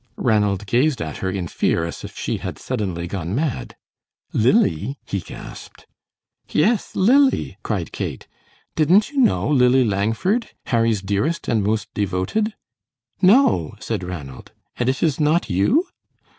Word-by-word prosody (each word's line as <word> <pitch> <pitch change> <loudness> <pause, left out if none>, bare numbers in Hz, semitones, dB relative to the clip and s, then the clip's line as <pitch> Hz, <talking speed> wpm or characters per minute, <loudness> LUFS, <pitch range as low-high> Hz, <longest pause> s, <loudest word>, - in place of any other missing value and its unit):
Ranald 105 -4 +1
gazed 125 +5 +2
at 80 -1 -4
her 95 - -2
in 95 -2 -3
fear 85 0 0
as 85 - -7
if - - -9
she - - -2
had - - -6
suddenly 90 -5 -3
gone 90 +1 -4
mad. 145 -2 -2 0.6
"Lily?" 105 - +2
he 100 - -2
gasped. 85 - -11 0.6
"Yes, 205 +7 +1
Lily," 265 +8 +3
cried - - -3
Kate; - - -5 0.5
"didn't 180 - +4
you 285 - -2
know 245 - +3
Lily 130 -2 +4
Langford, 115 - 0 0.2
Harry's 115 -4 +1
dearest 105 +13 -1
and 110 -3 +1
most 105 0 -1
devoted?" 105 - -1 0.7
"No," 185 - +4
said - - -3
Ranald; 75 -8 -8 0.2
"and 125 +1 0
it 130 - -1
is 155 -4 +1
not 155 - +2
you?" 215 - +3
115 Hz, 140 wpm, -21 LUFS, -, 0.7 s, didn't